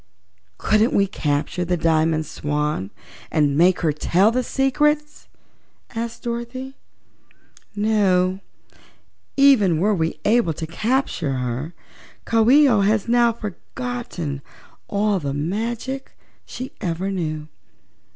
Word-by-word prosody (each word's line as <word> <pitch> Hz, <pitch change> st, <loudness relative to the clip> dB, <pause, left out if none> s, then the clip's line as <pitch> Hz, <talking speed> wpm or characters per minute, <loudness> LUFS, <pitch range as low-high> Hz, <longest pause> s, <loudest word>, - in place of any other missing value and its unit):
"Couldn't 215 Hz, +3 st, +2 dB
we 200 Hz, -, +4 dB
capture 155 Hz, -2 st, -2 dB
the 175 Hz, 0 st, 0 dB
Diamond 160 Hz, -1 st, +2 dB
Swan 150 Hz, -9 st, -2 dB, 0.4 s
and 145 Hz, -3 st, +2 dB
make 175 Hz, +4 st, +4 dB
her 160 Hz, -4 st, +1 dB
tell 185 Hz, +7 st, +3 dB
the 255 Hz, +2 st, +1 dB
secrets?" 300 Hz, +4 st, 0 dB, 0.7 s
asked 230 Hz, 0 st, -5 dB
Dorothy. 240 Hz, +3 st, -5 dB, 1.0 s
"No; 195 Hz, -3 st, +2 dB, 1.0 s
even 245 Hz, -, +5 dB
were 210 Hz, +4 st, +2 dB
we 165 Hz, -4 st, -1 dB
able 220 Hz, -6 st, +3 dB
to 160 Hz, -, -5 dB
capture 180 Hz, -, -1 dB
her, 130 Hz, +5 st, -3 dB, 0.5 s
Coo 225 Hz, 0 st, +3 dB
ee 290 Hz, +2 st, +7 dB
oh 225 Hz, -6 st, +3 dB, 0.3 s
now 240 Hz, 0 st, +4 dB
has 230 Hz, -, -14 dB
forgotten 210 Hz, -, -5 dB, 0.5 s
all 205 Hz, -1 st, +1 dB
the 140 Hz, -3 st, -3 dB
magic 230 Hz, -, -3 dB, 0.3 s
she 255 Hz, +1 st, -7 dB
ever 185 Hz, +1 st, -2 dB
knew. 155 Hz, -5 st, -3 dB
200 Hz, 110 wpm, -22 LUFS, 160-235 Hz, 1.0 s, ee